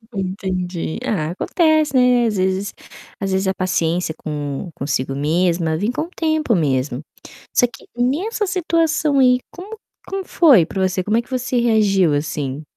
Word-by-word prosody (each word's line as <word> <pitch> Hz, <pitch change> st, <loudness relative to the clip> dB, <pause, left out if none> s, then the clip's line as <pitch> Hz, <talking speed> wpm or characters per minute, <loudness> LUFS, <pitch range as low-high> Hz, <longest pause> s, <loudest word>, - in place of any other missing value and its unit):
Entendi, 185 Hz, -3 st, -3 dB
ah, 170 Hz, -10 st, -1 dB
acontece, 310 Hz, -, +1 dB
né, 250 Hz, -1 st, +4 dB
às 210 Hz, -, -1 dB
vezes 190 Hz, +2 st, -1 dB, 0.5 s
às 195 Hz, -1 st, -2 dB
vezes 190 Hz, 0 st, 0 dB
a 190 Hz, -, +1 dB
paciência 175 Hz, -3 st, -1 dB
com 145 Hz, +2 st, -5 dB
consigo 135 Hz, -1 st, -2 dB
mesma, 165 Hz, +3 st, +1 dB
vem 210 Hz, +8 st, 0 dB
com 280 Hz, -, -2 dB
o 335 Hz, -, -8 dB
tempo 315 Hz, -7 st, +1 dB
mesmo. 135 Hz, -4 st, 0 dB, 0.5 s
Só -, -, +4 dB
que 235 Hz, -, -15 dB
nessa 355 Hz, -, 0 dB
situação 325 Hz, -5 st, +1 dB
aí 250 Hz, -1 st, +5 dB
como 405 Hz, +5 st, -9 dB, 0.3 s
como 390 Hz, 0 st, -3 dB
foi 275 Hz, -, +5 dB
para 190 Hz, -, -4 dB
você? 185 Hz, 0 st, -2 dB
Como 215 Hz, +3 st, +1 dB
é -, -, +2 dB
que 235 Hz, -, -23 dB
você 255 Hz, -1 st, -1 dB
reagiu, 205 Hz, -8 st, +3 dB
assim? 145 Hz, -1 st, -3 dB
195 Hz, 160 wpm, -20 LUFS, 165-260 Hz, 0.5 s, aí